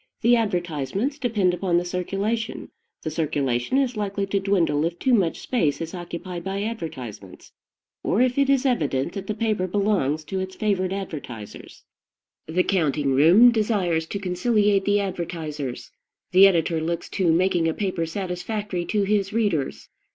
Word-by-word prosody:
The 240 +1 +5
advertisements 190 - -1
depend 210 -9 +1
upon 180 -1 +1
the 175 - 0
circulation; 195 +5 -2 0.3
the 155 - -3
circulation 145 - 0
is 260 -3 +1
likely 200 -1 -2
to 195 0 0
dwindle 175 -7 +1
if 170 +1 -2
too 255 +7 +1
much 185 -8 +2
space 155 - 0
is 165 0 -5
occupied 175 0 -6
by 195 +2 -3
advertisements, 125 - -7 0.5
or 200 - 0
if 255 +1 +2
it 275 -1 +3
is 275 -1 +3
evident 155 - 0
that 195 -1 -6
the 215 - -2
paper 210 -4 0
belongs 185 -7 0
to 190 +5 -4
its 190 0 -5
favored 195 -4 0
advertisers. 140 - -7 0.6
The 175 +3 +1
counting 150 -7 +1
room 175 - +7
desires 195 -8 0
to 200 - -4
conciliate 200 +1 +1
the 205 0 +3
advertisers; 160 -8 -4 0.4
the 190 +2 +8
editor 165 -3 +1
looks 170 +1 -2
to 180 -4 +1
making 175 0 +2
a 160 - +1
paper 185 -5 -2
satisfactory 185 +1 -3
to 210 +1 0
his 200 -1 +1
readers. 205 -11 -1
185 Hz, 155 wpm, -24 LUFS, 165-210 Hz, 0.6 s, the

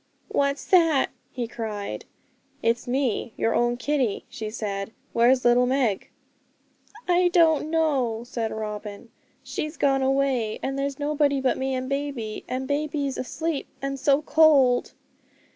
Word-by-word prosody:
'What's 280 0 0
that?' 330 -7 +4 0.2
he 245 -2 -3
cried. 210 - -5 0.6
'It's 230 +2 +1
me, 245 -3 -1
your 225 - +1
own 240 0 +1
Kitty,' 255 -4 -1
she 215 -1 -5
said; 205 -1 -4 0.2
'where's 245 +2 +4
little 245 +1 +5
Meg?' 250 -6 0 1.0
'I 355 0 +4
don't 325 -3 +3
know,' 275 -9 +1
said 230 -2 -3
Robin, 210 0 -6 0.3
'she's 305 +1 -5
gone 270 -1 +2
away, 265 -5 +1
and 270 +1 -2
there's 275 0 -2
nobody 290 -1 +1
but 260 -1 +1
me 265 0 -2
and 255 0 -3
baby; 275 -6 -3
and 260 +1 -3
baby's 285 -1 -1
asleep, 315 +3 -3
and 275 0 -4
so 280 +2 +3
cold.' 285 -6 +4
265 Hz, 135 wpm, -25 LUFS, 235-285 Hz, 1.0 s, little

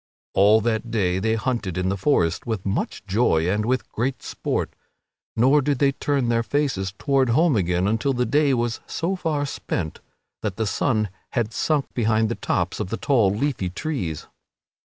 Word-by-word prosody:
All 105 +3 +5
that 115 +1 -1
day 95 -5 +1
they 110 +3 +1
hunted 110 -6 -2
in 90 0 0
the 100 - 0
forest 95 - +1
with 110 -5 -3
much 100 +1 -2
joy 95 -5 +2
and 105 +3 +1
with 130 0 -1
great 125 +4 -2
sport, - - -3 0.6
nor 135 +6 +4
did 140 0 0
they 140 +1 +3
turn 140 -2 -1
their 115 0 +2
faces 115 -8 -1
toward 135 -3 +2
home 155 +4 +3
again 90 -1 +1
until 115 +6 +1
the 125 -1 0
day 145 -1 +3
was 120 -1 -1
so 180 +4 -2
far 155 -5 -1
spent 85 - -4 0.4
that 105 -4 -2
the 110 - -1
sun 110 +1 0 0.2
had 115 -3 -1
sunk 150 +1 0
behind 110 -2 +2
the - - 0
tops - - -1
of - - -3
the 115 - -2
tall 120 -8 +3
leafy 105 -2 -1
trees. 95 - -4
115 Hz, 175 wpm, -23 LUFS, 100-135 Hz, 0.6 s, All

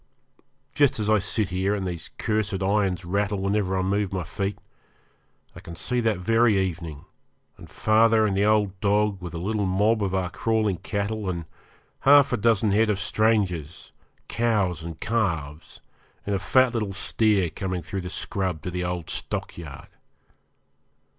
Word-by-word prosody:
Just 145 -5 +3
as 105 0 +1
I 110 - +5
sit 105 +1 0
here, 95 +3 0
and 100 -2 -3
these 85 -3 -5
cursed 105 -3 -1
irons 95 -3 0
rattle 100 +3 0
whenever 95 -1 0
I 95 - 0
move 100 +1 0
my 95 -2 -2
feet, 95 +4 -3 1.0
I - - -9
can 85 - -10
see 125 +9 -1
that 110 -4 +1
very 115 +3 +3
evening, 85 -4 -4 0.5
and - - -14
father 110 0 +3
and 100 -2 0
the 100 - +2
old 105 -2 +2
dog 105 0 +1
with 85 -1 -7
a - - -3
little 100 +3 -1
mob 105 +4 +2
of 95 -2 -1
our 90 -1 -1
crawling 110 -4 0
cattle 100 +2 -3
and 85 -2 -4 0.5
half 140 -1 +6
a - - +2
dozen 110 -1 +2
head 110 +2 +3
of 105 - +1
strangers, 100 -7 0 0.4
cows 100 -8 0
and 80 -2 -7
calves, 85 -10 -2 0.4
and 100 - -1
a 100 - 0
fat 130 +5 +3
little 105 -4 -2
steer 100 -2 +1
coming 95 0 -4
through 100 - -4
the 90 - -6
scrub 95 -4 -3
to 90 - -4
the 90 0 -3
old 90 -2 -3
stockyard. 75 -5 -6
100 Hz, 165 wpm, -25 LUFS, 90-110 Hz, 1.0 s, half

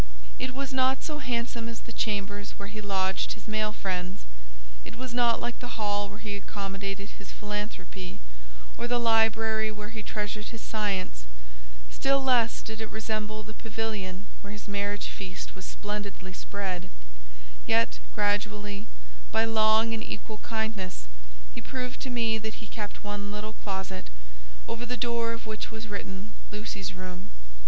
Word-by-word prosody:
It 255 0 0
was 275 0 -1
not 260 0 +4
so 300 -1 -1
handsome 235 -3 0
as 230 - -5
the 235 - -8
chambers 205 -2 0
where 200 0 -4
he 215 0 -4
lodged 190 -2 +2
his - - -11
male 215 0 +2
friends; 185 -2 -1 0.6
it - - -7
was 255 0 -4
not 240 -1 +5
like 240 0 -1
the 245 - -4
hall 205 -1 +2
where 205 - -7
he 210 -1 -2
accommodated 195 0 -2
his - - -7
philanthropy, 210 -3 -3 0.6
or 240 - +1
the 245 0 +4
library 225 -1 +5
where 210 -1 -4
he 225 -1 -4
treasured 210 0 -1
his 230 - -6
science, 195 - 0 0.7
still 275 0 +5
less 245 -3 +5
did 220 0 -3
it 220 - -2
resemble 215 -1 -1
the 215 - -7
pavilion 215 -4 -2 0.2
where 200 - -6
his 210 0 -6
marriage 205 0 +1
feast 190 -2 -4
was 185 - -7
splendidly 205 -2 -3
spread; 190 -3 -2 0.8
yet, - - +5 0.2
gradually, 205 0 +2 0.4
by 225 0 +5
long 220 0 +6
and 220 -1 0
equal 215 - -4
kindness, 220 - -1 0.5
he - - -4
proved 250 -1 -2
to 265 - -1
me 225 -3 +3
that 220 0 -2
he 220 - -7
kept 210 -2 -4
one 205 0 -2
little 210 +1 -3
closet, 190 -2 -3 0.6
over 230 +1 -2
the 245 +1 -1
door 235 -1 +2
of 230 0 -4
which 215 0 -2
was 220 0 -5
written 200 0 -4 0.2
"Lucy's 210 -2 -2
Room." 185 0 -5
215 Hz, 160 wpm, -31 LUFS, 200-225 Hz, 0.8 s, long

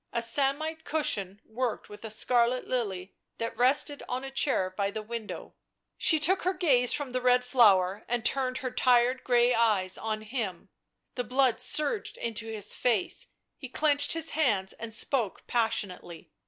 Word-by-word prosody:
A - - -1
samite 290 +6 -1
cushion 205 - -1
worked 240 +1 -4
with 210 +1 -12
a 220 - -6
scarlet 240 +3 +2
lily 200 -7 -3 0.2
that 230 0 -4
rested 275 +4 +2
on 250 +1 -3
a 270 - -7
chair 265 -9 0
by 200 0 -1
the 215 +1 -6
window. 225 -1 -7 0.4
She 315 - +4
took 360 +5 +3
her 370 +1 -1
gaze 265 -9 +3
from 285 -3 -3
the 255 0 -2
red 250 0 +3
flower 205 -6 +3
and 240 -2 -2
turned 260 -1 0
her 255 - -2
tired 250 +1 +2
grey 245 0 +3
eyes 210 -5 +1
on 215 -1 -3
him. 210 -5 -5 0.4
The 245 - -3
blood 255 -1 +1
surged 400 +8 +1
into 225 -1 -5
his 215 -2 -2
face; 230 -7 -1 0.3
he 260 - -8
clenched 290 +1 +1
his 330 -1 0
hands 210 -11 0
and 230 0 -8
spoke 225 -2 0
passionately. 195 -7 -3
240 Hz, 165 wpm, -28 LUFS, 215-270 Hz, 0.4 s, She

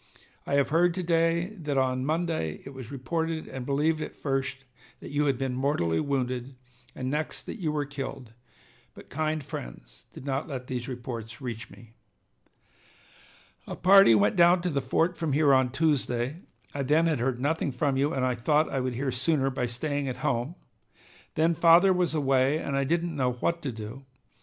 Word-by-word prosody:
I 140 - +1
have 140 -1 +2
heard 170 +2 +3
to 185 - -2
day 165 +1 +2
that 150 -5 -3
on 130 0 +1
Monday 155 - -1
it 135 - -8
was 130 -2 -9
reported 160 +5 -3
and 130 -1 -7
believed 155 +3 +1
at - - -6
first 135 -1 -2 0.4
that - - -9
you 145 +1 +1
had 135 -3 +1
been 135 -1 -2
mortally 125 - 0
wounded, 130 -2 -2 0.4
and 130 - -4
next 155 +1 -3
that 225 - -8
you 155 -3 0
were 150 -1 -1
killed, 135 -4 -7 0.6
but - - -14
kind 155 +1 -1
friends - - -9
did - - -11
not 135 +1 -2
let 130 -4 -5
those 125 -1 -4
reports 120 -3 -6
reach 115 -4 -6
me. 115 -1 -16 1.7
"A - - -5
party 195 - +7
went 105 0 +3
down 175 +1 +5
to 180 - 0
the 140 -2 0
fort 165 +7 0
from 160 -4 -1
here 145 -1 +4
on 130 -1 +4
Tuesday. 135 -2 0 0.4
I 140 - -3
then 150 +5 +3
had 160 -6 +1
heard 120 0 -1
nothing 145 +1 0
from 135 +2 0
you, 140 +3 +1
and 130 -1 0
I 130 - +1
thought 150 +6 +1
I 135 - +1
would 130 -1 -2
hear 130 +2 -1
sooner 135 +2 +1
by 125 -1 -2
staying 145 +4 -2
at 125 -1 -3
home. 120 +8 -1 0.8
Then 165 +2 +3
father 170 +4 +6
was 180 -3 0
away, 135 0 +2
and 140 -3 -3
I 140 0 +1
didn't 170 +2 -1
know 130 -3 +1
what 170 +7 -1
to 135 - -3
do. 110 +4 -8
140 Hz, 190 wpm, -27 LUFS, 125-155 Hz, 1.7 s, party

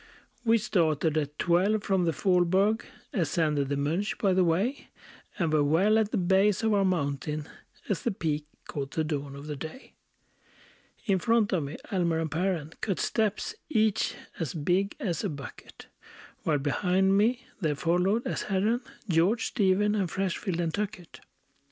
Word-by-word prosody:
We 230 -1 +4
started 165 -8 +1
at 150 -1 -2
twelve 195 +5 +2
from 190 -3 +1
the 165 - +2
Faulberg; 185 +6 +2 0.3
Ascended 150 -5 +1
the 140 - 0
Monch 165 +9 -1
by 195 -3 +2
the 185 0 +4
way; 190 +11 0 0.5
And 165 -5 0
were 150 -1 +4
well 190 +9 +4
at 215 -2 +1
the - - -1
base 190 +3 +3
of 220 -1 +3
our 200 -1 +3
mountain, 150 -4 -1 0.4
As 200 - -1
the - - 0
peak 155 -7 -2 0.2
caught 140 -2 -4
the 160 - -1
dawn 145 -3 -3
of 140 +1 -9
the 150 -1 -4
day. 160 - -9 1.1
In 195 -2 +2
front 225 -1 +2
of 180 - +2
me 140 - -6
Almer 170 -4 +1
and 160 -1 -2
Perren 165 -2 -1
Cut 195 -4 -1
steps, 220 - 0 0.2
each 220 -6 +1 0.2
as 160 -5 -3
big 180 +6 0
as 175 -7 -2
a - - 0
bucket; 140 -3 -9 0.6
While 155 -2 +1
behind 185 +7 +2
me 240 +5 +2
there 155 -6 0
followed, 180 - +1
as - - -2
Herren, 210 +5 +1 0.3
George, 185 +7 +2
Stephen, 205 -1 +2
and 195 -4 0
Freshfield, 190 -1 -2
and 165 -2 -1
Tuckett. 205 -4 -5
180 Hz, 165 wpm, -28 LUFS, 155-205 Hz, 1.1 s, We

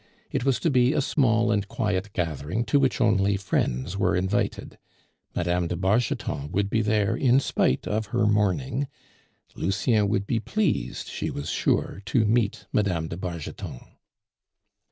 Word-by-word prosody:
It - - -1
was 135 -2 +2
to 165 - +2
be 125 +1 +4
a - - +1
small 120 -5 +2
and 105 -2 0
quiet 105 -1 -2
gathering 85 - -2
to 140 +5 +3
which 135 -2 +1
only 100 -4 +3
friends 90 -4 -1
were 95 -2 +1
invited 95 +3 -1 0.6
Mme. 90 0 0
de 90 - -2
Bargeton 95 - 0
would 100 +2 0
be 115 - +2
there 105 -2 +1
in 130 0 +4
spite 65 - 0
of 110 0 -1
her 115 -1 +1
mourning; 110 +7 +1 0.7
Lucien 100 +3 +1
would 100 -1 0
be 115 +2 0
pleased, 145 - -1
she - - -3
was 70 - -4
sure, 95 - 0
to 115 -1 +2
meet 110 -1 +1
Mme. 90 -6 +1
de 85 - -5
Bargeton. 85 -8 -6
105 Hz, 155 wpm, -26 LUFS, 90-120 Hz, 0.7 s, be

